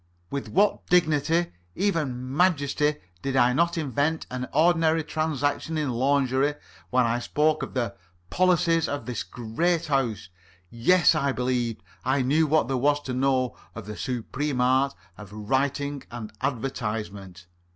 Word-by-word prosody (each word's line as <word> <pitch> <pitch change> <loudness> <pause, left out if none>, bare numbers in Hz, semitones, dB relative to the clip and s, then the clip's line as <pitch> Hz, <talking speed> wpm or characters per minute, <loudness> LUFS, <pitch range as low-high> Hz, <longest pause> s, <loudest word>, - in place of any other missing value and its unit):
With 140 -1 -4
what 205 +3 +2
dignity 165 0 +2 0.2
even 135 -10 -1
majesty 150 -3 +2 0.3
did 135 -1 -2
I 125 -1 +4
not 170 +5 +1
invest 150 +1 -1
an 125 0 -4
ordinary 165 0 +3
transaction 155 0 -1
in 150 -4 -1
lingerie, 135 +2 +1 0.3
when 125 +3 +3
I 115 +1 0
spoke 150 +5 +1
of - - -6
'the 120 -2 -1 0.4
policy 175 -2 +3
of 145 - -4
this 125 -3 -3
great 160 +9 -1
House'! 125 - -1 0.4
Yes, 165 +12 +4
I 140 -3 +1
believed 125 -3 -1 0.2
I 130 0 +1
knew 155 +5 +3
what 155 -5 +2
there 135 -1 0
was 145 +3 +2
to 130 -3 -5
know 130 -1 +1 0.2
of 115 - -7
the 105 0 -6
supreme 130 +3 -3
art 130 +2 +2 0.2
of 105 -2 -10
writing 135 +6 -1
an 115 -3 -7
advertisement. 105 -8 -4
135 Hz, 140 wpm, -26 LUFS, 125-155 Hz, 0.4 s, I